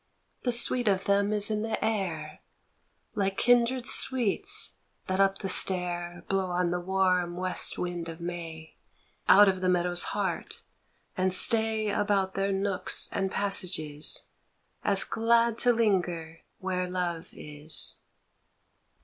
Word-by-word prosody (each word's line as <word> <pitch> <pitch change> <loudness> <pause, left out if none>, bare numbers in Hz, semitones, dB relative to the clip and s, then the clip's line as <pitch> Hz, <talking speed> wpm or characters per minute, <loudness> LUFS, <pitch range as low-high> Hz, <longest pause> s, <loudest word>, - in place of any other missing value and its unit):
The 245 - -1
sweet 240 0 +2
of 195 -1 +1
them 200 +1 +1
is 210 0 +4
in 210 0 -1
the 225 0 -2
air 175 -8 -3 0.7
Like 195 -2 -2
kindred 245 +1 +2
sweets 265 - +2 0.3
that 190 0 -2
up 195 0 +2
the 195 - -5
stair 175 -2 -1
Blow 195 -1 -1
on 175 -1 -1
the 180 - -1
warm 180 -1 0
west 185 0 +1
wind 175 -2 -4
of 165 0 -9
May 165 -2 -8 0.5
Out 205 +1 +8
of 190 -1 0
the 185 - +1
meadow's 175 0 0
heart 195 -5 -4 0.5
and 185 0 0
stay 220 +2 +4
About 200 -2 0
their 195 +1 -1
nooks 195 0 0
and 195 -1 -2
passages 180 -7 -2 0.6
As 200 -1 +2
glad 230 0 +1
to 245 - +4
linger 180 -8 -1 0.2
where 185 -1 -3
love 175 -2 -4
is. 150 +1 -2
190 Hz, 130 wpm, -27 LUFS, 175-210 Hz, 0.7 s, Out